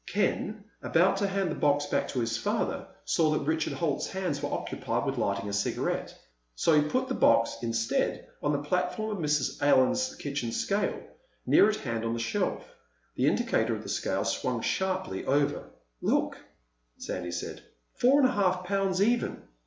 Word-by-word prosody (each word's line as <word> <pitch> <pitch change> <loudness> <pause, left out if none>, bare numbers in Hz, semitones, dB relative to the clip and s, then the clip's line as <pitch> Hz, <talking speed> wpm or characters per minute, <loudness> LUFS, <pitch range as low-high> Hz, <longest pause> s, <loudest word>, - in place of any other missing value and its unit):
Ken, 210 +1 -1 0.2
about 185 +4 +3
to 200 0 +1
hand 195 -3 -1
the - - -2
box 145 0 +2
back 145 - 0
to 125 - -2
his 115 0 -1
father, 115 - -1 0.2
saw 160 -2 +2
that 155 -2 0
Richard 160 +1 0
Holt's 155 -5 -1
hands 185 -7 -2
were 145 - -3
occupied - - -2
with - - -2
lighting 100 0 -1
a 100 - -4
cigarette. 100 0 -1 0.4
So 165 - +3
he 150 0 +4
put 260 +6 0
the 260 - -2
box, 115 - +3
instead, 115 -1 -1
on 145 - +1
the 145 -1 -1
platform 180 +7 -1
of 175 - -4
Mrs. 150 -3 0
Allen's 145 - +3
kitchen 140 -5 -3
scale, 200 - 0 0.5
near 210 - +6
at 215 - 0
hand 115 - -3
on 115 0 -1
the - - -3
shelf. 115 - -1 0.5
The - - +2
indicator - - +1
of - - -7
the - - -8
scale - - -1
swung - - -1
sharply 190 - -1
over. 140 +1 +1 0.4
"Look," - - +1 0.6
Sandy 90 -1 -4
said. - - -5 0.3
"Four 270 +4 +4
and 260 - +6
a - - 0
half 185 -5 +1
pounds 195 0 +1
even. 235 +3 0
155 Hz, 175 wpm, -29 LUFS, 130-195 Hz, 0.6 s, near